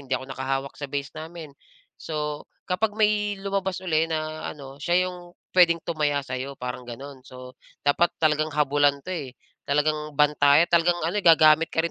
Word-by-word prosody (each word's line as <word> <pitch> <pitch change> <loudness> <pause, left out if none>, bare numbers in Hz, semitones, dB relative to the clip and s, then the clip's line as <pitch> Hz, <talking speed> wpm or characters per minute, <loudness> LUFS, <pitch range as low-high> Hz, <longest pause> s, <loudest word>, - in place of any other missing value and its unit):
hindi 135 -1 -3
ako 130 - -8
nakahawak 135 +1 -3
sa 145 - -4
base 140 +1 -4
namin, 160 -1 -8 0.5
so, 150 -2 -4 0.2
kapag 205 +3 0
may 210 -1 +1
lumabas 195 -1 -2
uli 165 -3 +1
na 155 -1 -4
ano, 140 -2 -9
siya 180 +4 +1
yung 175 -1 -12 0.2
puwedeng 170 -2 +4
tumaya 150 -4 -1
sa'yo, 130 +1 -5
parang 125 0 -6
gano'n. 135 +3 -9
So, 125 0 -12 0.2
dapat 155 +4 +2
talagang 155 -1 +1
habulan 145 -1 +2
'to, 185 - -8
eh. 140 -7 -5 0.3
Talagang 150 +1 0
bantayan, 150 +2 +4
talagang 175 +1 +3
ano, 175 +6 -1
eh, - - -4
gagamit 160 -1 +6
ka 160 - -1
rin 170 - -2
155 Hz, 170 wpm, -25 LUFS, 140-175 Hz, 0.5 s, gagamit